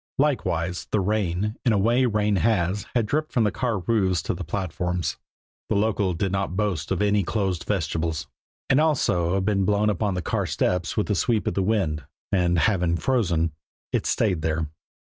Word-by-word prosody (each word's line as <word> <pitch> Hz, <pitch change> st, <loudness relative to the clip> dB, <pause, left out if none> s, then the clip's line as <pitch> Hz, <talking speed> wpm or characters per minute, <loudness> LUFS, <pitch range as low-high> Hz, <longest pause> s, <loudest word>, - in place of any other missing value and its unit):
Likewise, 90 Hz, -, 0 dB
the 105 Hz, -, +1 dB
rain, 100 Hz, 0 st, 0 dB
in 120 Hz, -, +3 dB
a -, -, +3 dB
way 120 Hz, +6 st, +3 dB
rain 105 Hz, -2 st, +1 dB
has, 100 Hz, -1 st, +1 dB
had 120 Hz, -3 st, +3 dB
dripped 155 Hz, +6 st, -1 dB
from 120 Hz, -, +2 dB
the 105 Hz, -, +2 dB
car 120 Hz, -4 st, -1 dB
roofs 95 Hz, -3 st, +1 dB
to -, -, -1 dB
the 90 Hz, -, -5 dB
platforms 90 Hz, 0 st, -2 dB, 0.5 s
the -, -, +1 dB
local 100 Hz, -3 st, +1 dB
did 95 Hz, +2 st, -1 dB
not 95 Hz, -2 st, -1 dB
boast 100 Hz, -8 st, -1 dB
any 105 Hz, +2 st, +2 dB
closed 95 Hz, -3 st, -1 dB
vestibules 80 Hz, -4 st, -1 dB, 0.4 s
and 130 Hz, -, +4 dB
had -, -, +4 dB
also 90 Hz, -, +1 dB
been 100 Hz, 0 st, +1 dB
blown 105 Hz, +2 st, +2 dB
upon 100 Hz, 0 st, -1 dB
the 90 Hz, -, -3 dB
car -, -, -1 dB
steps 90 Hz, -2 st, -1 dB
with 105 Hz, -, +2 dB
the 105 Hz, -, 0 dB
sweep 110 Hz, +3 st, +1 dB
of -, -, 0 dB
the 100 Hz, -, 0 dB
wind, 95 Hz, -7 st, 0 dB, 0.3 s
and, 90 Hz, -2 st, +2 dB
having 90 Hz, -2 st, +2 dB
frozen, 85 Hz, -7 st, +1 dB, 0.4 s
it -, -, 0 dB
stayed 95 Hz, -7 st, +1 dB
there. 80 Hz, 0 st, -1 dB
95 Hz, 185 wpm, -25 LUFS, 85-105 Hz, 0.5 s, and